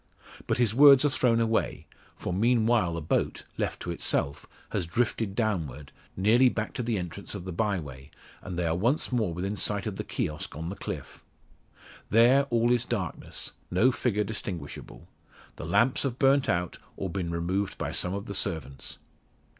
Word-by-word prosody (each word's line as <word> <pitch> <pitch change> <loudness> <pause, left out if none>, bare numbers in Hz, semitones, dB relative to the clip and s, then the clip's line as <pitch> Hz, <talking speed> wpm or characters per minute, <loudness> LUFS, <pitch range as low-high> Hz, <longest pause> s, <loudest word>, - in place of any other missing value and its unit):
But - - +1
his 120 -3 +2
words 140 +1 +8
are 145 - +3
thrown 120 -4 +3
away; 115 -1 0 0.3
for, - - -4
meanwhile, 110 -3 +2
the 85 - -3
boat, 75 - -1 0.2
left - - -1
to 85 - -3
itself, 70 -4 -2 0.2
has 85 - -1
drifted 110 +1 -1
downward, 80 - -2 0.3
nearly 115 +7 +5
back 110 -2 -3
to - - -3
the 115 -2 -1
entrance 90 -3 -5
of 90 - -6
the 95 - -4
bye 100 +2 0
way, 70 -2 -10 0.3
and 90 -2 -6
they 90 - 0
are 80 - +1
once 120 - +1
more 110 -8 +1
within 95 +5 -3
sight 100 -1 -1
of - - -4
the - - -3
kiosk 75 -1 -4
on 80 +2 -4
the 95 - -5
cliff. - - -7 0.9
There 125 +5 +5
all 120 0 +2
is 120 -1 +3
darkness; 105 -8 -4 0.2
no 110 +9 +4
figure 120 -3 0
distinguishable. 95 -8 -6 0.5
The - - -6
lamps 115 +6 +3
have 130 -3 -2
burnt 135 0 +3
out, 90 0 -1 0.2
or 95 - -2
been 90 -1 -3
removed 90 +4 -1
by - - -3
some 90 +2 0
of 100 - -5
the 100 - -5
servants. 70 -8 -3
100 Hz, 180 wpm, -28 LUFS, 85-120 Hz, 0.9 s, words